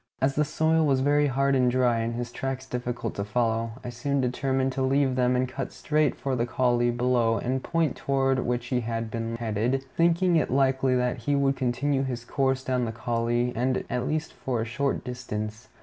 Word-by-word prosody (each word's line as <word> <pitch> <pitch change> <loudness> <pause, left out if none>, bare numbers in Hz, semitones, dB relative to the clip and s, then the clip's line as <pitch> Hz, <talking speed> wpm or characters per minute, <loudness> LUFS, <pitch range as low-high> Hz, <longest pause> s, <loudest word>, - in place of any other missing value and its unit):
As 135 +1 +2
the 150 - +2
soil 160 +2 +2
was 135 -2 +2
very 145 +1 +3
hard 140 +1 +1
and 130 -2 +3
dry, 120 -2 +2
and 115 +1 -2
his 120 0 -4
tracks 135 +1 -4
difficult 125 -2 -4
to 100 - -3
follow, 115 +1 0
I 120 - -5
soon 140 +4 -1
determined 130 +1 0
to 130 - -3
leave 135 0 +2
them 125 0 +2
and 130 +1 +1
cut 135 +2 -5
straight 150 -2 +1
for 135 -1 -2
the 120 -1 0
coulée 120 -1 +1
below 120 -2 +2
the 130 +2 -1
point 165 +2 0
toward 135 -1 +1
which 120 -1 -1
he 125 - +3
had 115 -1 -3
been 115 0 -3
headed, 115 +4 -1
thinking 170 +1 +3
it 155 - +1
likely 130 0 +2
that 125 0 0
he 135 +5 -1
would 140 -1 +2
continue 135 +2 0
his 125 -3 -4
course 135 0 0
down 125 -2 0
the 115 - -3
coulée, 120 +1 -1 0.4
at 125 0 -1
least 155 +1 -2
for 125 -3 -3
a 110 - -1
short 135 +4 -1
distance. 110 -3 -5
125 Hz, 200 wpm, -26 LUFS, 120-135 Hz, 0.4 s, very